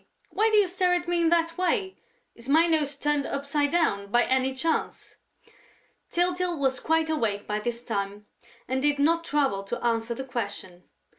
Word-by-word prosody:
Why 440 +2 +2
do 430 - +3
you 410 -2 +5
stare 360 0 +1
at 350 0 -3
me 345 -1 +1
in 330 - +3
that 335 0 +1
way?... 375 +1 0 0.4
Is 235 +3 -11
my 320 +4 +5
nose 305 -4 +1
turned 290 -1 0
upside 285 +1 -1
down, 280 -12 +1
by 240 +3 +3
any 260 +1 0
chance?" 325 +5 -2 0.9
Tyltyl 355 0 0
was 265 -2 0
quite 320 0 +1
awake 225 -10 -1
by 210 0 -2
this 235 +2 -4
time 205 -2 -4 0.4
and 260 +1 -1
did 290 0 +2
not 330 +4 +2
trouble 275 -11 0
to 200 - -4
answer 230 0 0
the 265 - -5
question. 200 -8 -6
285 Hz, 175 wpm, -26 LUFS, 235-335 Hz, 0.9 s, you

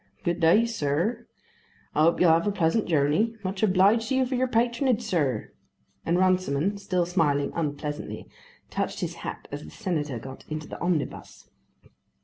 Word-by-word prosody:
Good 175 -2 0
day, 175 +7 +5
sir; 215 +3 -1 0.7
I - - +2
hope 165 +2 +4
you'll 175 -2 +6
have 165 +4 +3
a - - +2
pleasant 195 +3 +1
journey. 160 +9 +2
Much 190 0 -3
obliged 210 +3 +4
to 265 - +1
you 260 0 +3
for 255 - -4
your 255 +1 +1
patronage, 240 0 +1
sir," 150 - -1 0.6
and 170 +1 +2
Runciman, 185 0 +1
still 180 -3 0
smiling 155 -5 +1
unpleasantly, 150 -2 -4 0.4
touched - - -2
his - - -2
hat - - -6
as - - -5
the 75 - -10
Senator 150 - -3
got 130 +3 -9
into 155 0 -5
the - - -9
omnibus. 170 -6 -3
180 Hz, 160 wpm, -26 LUFS, 150-215 Hz, 0.7 s, you'll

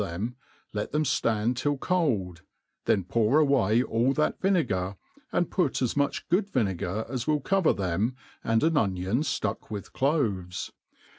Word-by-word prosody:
them, 100 +7 -4 0.4
let 105 -1 -3
them 150 +1 +1
flarid 115 -3 +1
till 145 +3 0
cold; 115 - 0 0.4
then 100 - +2
pour 115 - +2
away 125 -7 +3
all 120 +2 +1
that 150 +2 0
vinegar, 100 - +1 0.4
and 175 - 0
put 175 -8 +1
as 125 -3 0
much 145 -1 0
good 195 +4 +1
vinegar 100 - -1
as 125 -2 -4
will 150 -1 +2
cover 190 +4 +2
them, 100 +6 -1 0.3
and 115 +2 +2
an 160 0 +3
onion 95 0 +1
iluck 140 -9 -2
with 105 -2 -6
cloves. 110 - -1
120 Hz, 150 wpm, -27 LUFS, 100-150 Hz, 0.4 s, away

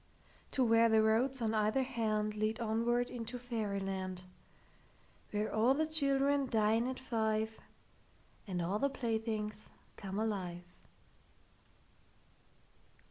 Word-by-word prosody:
To 265 - +3
where 230 0 +5
the 220 -1 +5
roads 240 +4 +2
on 220 0 +1
either 215 +4 +2
handLead 215 -3 -1
onward 235 +2 +1
into 235 0 -5
fairy 225 -5 -2
land, 190 -1 -3 1.1
Where 210 +1 -2
all 230 +5 +4
the 315 +2 +1
children 280 -2 +2
dine 225 +1 +2
at 260 0 -4
five, 220 -3 -1 0.9
And 180 -3 -2
all 195 +5 0
the 280 - +2
playthings 220 -4 -3 0.3
come 195 -1 -5
alive. 190 -5 -2
220 Hz, 110 wpm, -34 LUFS, 210-245 Hz, 1.1 s, where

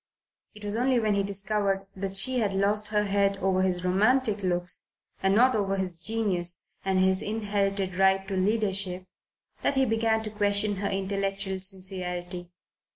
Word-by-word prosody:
It 210 0 -10
was 205 +1 -3
only 250 +1 +2
when 215 -2 +1
he 200 - +1
discovered 200 0 -2
that 195 0 -4
she 255 +5 +4
had 205 -4 -1
lost 205 +2 +1
her 210 0 +1
head 200 -1 +1
over 190 -1 0
his 180 -1 -1
romantic 215 +3 +2
looks, 180 -1 0 0.3
and 195 +1 +2
not 255 +3 +4
over 195 -2 0
his 190 -2 -1
genius 175 -2 -1 0.2
and 190 -1 0
his 190 +1 +2
inherited 200 -3 -2
right 190 0 +2
to 195 - -3
leadership, 190 -2 0 0.6
that - - 0
he 270 0 +3
began 225 -1 0
to 215 - -5
question 205 -1 +1
her 200 +1 -2
intellectual 195 0 -2
sincerity. 180 -2 0
195 Hz, 160 wpm, -27 LUFS, 190-210 Hz, 0.6 s, she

